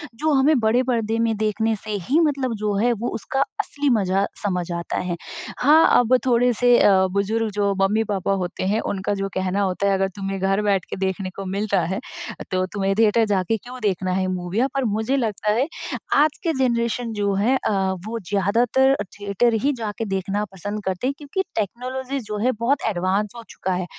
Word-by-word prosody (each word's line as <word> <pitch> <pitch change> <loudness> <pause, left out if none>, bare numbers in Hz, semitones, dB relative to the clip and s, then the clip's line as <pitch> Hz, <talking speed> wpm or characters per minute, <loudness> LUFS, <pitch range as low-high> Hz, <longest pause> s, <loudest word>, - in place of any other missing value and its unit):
जो 310 +7 0
हमें 275 +1 +4
बड़े 230 +3 +2
परदे 230 -3 0
में 230 -1 +1
देखने 220 +1 0
से 215 - -4 0.2
ही, 295 +5 +4
मतलब 275 -6 +1
जो 210 - +1
है, 240 +4 +3
वो 235 +2 -3
उसका 270 +4 -2 0.2
असली 290 0 -1
मज़ा 195 -4 +2 0.2
समझ 180 -3 -1
आता 170 0 -3
है। 180 -1 -2 0.4
हाँ, 305 +5 +6
अब 245 +1 +4
थोड़े 245 0 +3
से 245 +1 +4
अ, - - +6 0.2
बुज़ुर्ग 200 +2 0 0.2
जो 200 0 +1
मम्मी-पापा 200 -1 +1
होते 175 0 -4
हैं, 205 +3 +1
उनका 200 -2 -2
जो 195 -1 -2
कहना 190 +1 0
होता 195 +1 +1
अगर 195 0 +1
तुम्हें 195 -1 -4
घर 195 +2 +1
बैठ 200 -3 +1
के - - -4
देखने 190 0 -2
को 195 - -6
मिल 200 +3 -2
रहा - - +4
है, 190 +4 -2 0.5
तो 185 0 +1
तुम्हें 195 -1 0
थिएटर 225 +1 +4
जाके 200 +2 +1
क्यों 245 +4 -10
देखना 185 -2 0
है 185 0 0
मूवीया? 185 +6 -1
पर 275 -1 0
मुझे 220 +4 0
लगता 215 -4 0
है, 250 +6 +1 0.5
आज 295 +1 +3
के 330 -3 +1
जनरेशन 235 -2 0
जो 205 -1 0
है 220 +7 +2
अ, - - -2 0.3
वो 230 +1 -4
ज़्यादातर 230 +7 +3
अ, - - 0 0.2
थिएटर 205 +4 +1
ही 285 +1 +2
जाके 220 0 -4
देखना 195 +1 -2
पसंद 205 +3 -5
करते 190 +6 -1
हैं 275 - 0
क्योंकि 300 +6 -3
टेक्नोलॉजीज़ 255 +5 -3
जो 210 0 -4
है 255 - +4
बहुत 265 +5 +1
एडवांस 195 +2 0
हो 235 - -8
चुका 190 - -3
है। 180 0 -2
210 Hz, 200 wpm, -22 LUFS, 195-245 Hz, 0.5 s, हाँ